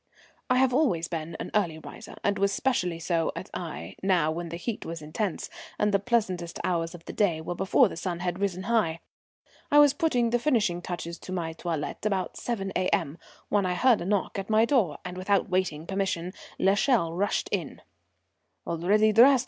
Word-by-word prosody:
I 255 Hz, -, +4 dB
have 260 Hz, -1 st, +3 dB
always 220 Hz, -, +2 dB
been 165 Hz, 0 st, -5 dB
an -, -, -5 dB
early 175 Hz, -7 st, +1 dB
riser, 160 Hz, -, -10 dB
and 200 Hz, -1 st, +1 dB
was 200 Hz, 0 st, +3 dB
specially 180 Hz, -8 st, 0 dB
so 165 Hz, -1 st, 0 dB
at -, -, -7 dB
Aix, 170 Hz, -3 st, -6 dB
now 180 Hz, -5 st, +2 dB
when 170 Hz, +1 st, -4 dB
the 170 Hz, -, -5 dB
heat 215 Hz, +5 st, -4 dB
was 165 Hz, 0 st, -5 dB
intense, 175 Hz, +5 st, -3 dB, 0.3 s
and 210 Hz, 0 st, +2 dB
the 200 Hz, -, +4 dB
pleasantest 190 Hz, -7 st, -1 dB
hours 170 Hz, -1 st, -1 dB
of 170 Hz, -1 st, -13 dB
the -, -, -7 dB
day 180 Hz, -7 st, +2 dB
were 160 Hz, +2 st, -4 dB
before 195 Hz, +7 st, +4 dB
the -, -, -7 dB
sun 175 Hz, +1 st, -3 dB
had 180 Hz, 0 st, -2 dB
risen 190 Hz, -2 st, -1 dB
high. 200 Hz, -7 st, +1 dB, 0.7 s
I 295 Hz, -, +4 dB
was 290 Hz, -2 st, +7 dB
putting 265 Hz, -8 st, +1 dB
the 240 Hz, -, +2 dB
finishing 215 Hz, -11 st, +1 dB
touches 170 Hz, -1 st, -5 dB
to -, -, -9 dB
my 170 Hz, -3 st, -2 dB
toilette 165 Hz, -3 st, -4 dB
about 195 Hz, -3 st, -1 dB
7 195 Hz, -5 st, -3 dB
A.M. 170 Hz, -4 st, 0 dB, 0.3 s
when 200 Hz, -2 st, +2 dB
I 180 Hz, -, 0 dB
heard 250 Hz, +3 st, +4 dB
a -, -, -4 dB
knock 200 Hz, 0 st, 0 dB
at 195 Hz, -, -6 dB
my 220 Hz, +1 st, +5 dB
door, 220 Hz, -, +2 dB
and 180 Hz, 0 st, -6 dB
without 195 Hz, +1 st, +1 dB
waiting 180 Hz, -4 st, 0 dB
permission 190 Hz, -2 st, -2 dB, 0.2 s
l'Echelle 195 Hz, -2 st, +2 dB
rushed 200 Hz, +4 st, 0 dB
in. -, -, -3 dB, 0.8 s
"Already 205 Hz, +6 st, +2 dB
dressed? 255 Hz, +4 st, +7 dB
185 Hz, 190 wpm, -27 LUFS, 170-215 Hz, 0.8 s, was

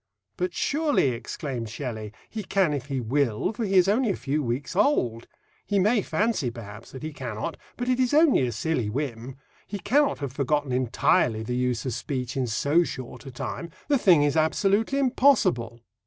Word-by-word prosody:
"But 180 Hz, 0 st, -2 dB
surely," 295 Hz, -, +2 dB
exclaimed 120 Hz, 0 st, -5 dB
Shelley, 110 Hz, -3 st, -5 dB, 0.2 s
"he 220 Hz, -, -5 dB
can 190 Hz, -5 st, +1 dB
if 140 Hz, -1 st, -4 dB
he 135 Hz, -2 st, -2 dB
will, 125 Hz, -, 0 dB
for 225 Hz, -, -3 dB
he 195 Hz, -2 st, 0 dB
is 185 Hz, 0 st, +6 dB
only 225 Hz, +4 st, +2 dB
a 195 Hz, -, +1 dB
few 145 Hz, +3 st, -1 dB
weeks 130 Hz, +5 st, -3 dB
old! 125 Hz, -, +1 dB, 0.4 s
He 205 Hz, -, -1 dB
may 210 Hz, +4 st, +3 dB
fancy 190 Hz, -, 0 dB
perhaps 110 Hz, -2 st, -10 dB
that 130 Hz, -, -9 dB
he 155 Hz, 0 st, -5 dB
cannot, 120 Hz, -6 st, -4 dB, 0.2 s
but 245 Hz, -, -3 dB
it 255 Hz, 0 st, +1 dB
is 255 Hz, -1 st, +2 dB
only 295 Hz, -, +4 dB
a -, -, -2 dB
silly 120 Hz, -1 st, -1 dB
whim; 125 Hz, 0 st, -4 dB, 0.3 s
he 205 Hz, -, -4 dB
cannot 285 Hz, +8 st, +2 dB
have 140 Hz, -3 st, -5 dB
forgotten 145 Hz, 0 st, 0 dB
entirely 120 Hz, -2 st, +2 dB
the 125 Hz, +2 st, -3 dB
use 125 Hz, 0 st, -1 dB
of 130 Hz, -, -2 dB
speech 130 Hz, 0 st, -4 dB
in 130 Hz, -2 st, 0 dB
so 140 Hz, +10 st, +2 dB
short 130 Hz, -2 st, -7 dB
a -, -, -7 dB
time; 170 Hz, +6 st, -5 dB, 0.2 s
the 285 Hz, -3 st, +3 dB
thing 175 Hz, -9 st, +5 dB
is 145 Hz, 0 st, +1 dB
absolutely 200 Hz, -, +2 dB
impossible." 215 Hz, -, +2 dB
145 Hz, 185 wpm, -26 LUFS, 120-200 Hz, 0.4 s, is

